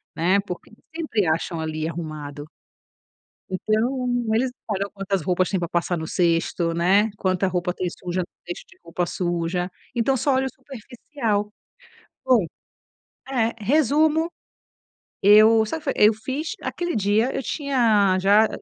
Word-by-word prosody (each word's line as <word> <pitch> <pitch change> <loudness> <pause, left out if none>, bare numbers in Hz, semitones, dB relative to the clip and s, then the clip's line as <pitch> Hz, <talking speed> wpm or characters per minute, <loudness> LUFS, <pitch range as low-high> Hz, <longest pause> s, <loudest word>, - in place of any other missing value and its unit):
né. 185 +4 +3
Porque 180 -3 -8 0.2
sempre 295 - 0
acham 165 +1 -1
ali 155 0 -3
arrumado. 155 -3 -6 1.0
Então, 225 +7 0 0.3
eles 250 +3 +1
não 220 -4 -6
olham 200 +1 -2
quantas 195 -1 -2
roupas 180 +2 +1
tem 190 - 0
para 170 -1 -3
passar 175 +1 0
no 160 0 -5
cesto, 170 -1 +1
né, 195 +6 +3
quanta 185 0 0
roupa 180 -1 -1
tem 185 - -3
suja 180 0 -3
no - - -4 0.2
cesto 175 - -6
de - - -20
roupa 170 +1 -2
suja. 175 0 -2 0.2
Então 245 +3 +1
só 275 +3 +1
olha 265 0 +1
o - - -4
superficial. 240 -4 -4 0.7
Bom. 245 -8 +4 0.8
É. 230 -4 +1
Resumo, 305 - +2 0.9
eu 215 +2 +7
sa 320 +9 -4
fe 280 - -1
eu 210 +1 +6
fiz 265 +8 -4
aquele 345 -3 -3
dia 215 +4 +2
eu - - -1
tinha 230 - +2
já 205 +3 +5
205 Hz, 145 wpm, -23 LUFS, 175-245 Hz, 1.0 s, eu